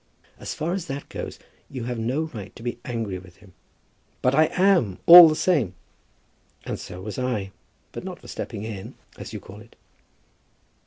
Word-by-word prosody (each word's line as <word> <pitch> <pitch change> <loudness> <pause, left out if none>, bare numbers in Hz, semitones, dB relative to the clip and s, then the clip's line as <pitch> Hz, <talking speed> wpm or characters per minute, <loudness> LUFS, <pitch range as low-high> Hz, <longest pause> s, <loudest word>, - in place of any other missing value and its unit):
"As - - -5
far 165 +3 -2
as 185 -2 -4
that 140 0 -6
goes, - - -6 0.3
you 130 -3 -6
have 120 0 -4
no 125 +8 -1
right 110 -11 -8
to 115 - -12
be 120 0 -4
angry 115 -6 -4
with 90 -1 -16
him." 100 -4 -19 0.7
"But 125 - +3
I 155 +3 +5
am, 180 - +2
all 170 -1 +12
the 155 - 0
same." 155 - +1 0.9
"And - - -4
so 90 - -9
was 105 +2 -5
I, 115 -7 -2 0.4
but - - -7
not - - -7
for - - -15
stepping 105 - -6
in, 105 -4 -7 0.2
as - - -8
you - - -6
call 100 +2 -12
it." 115 - -18
120 Hz, 180 wpm, -24 LUFS, 105-155 Hz, 0.9 s, all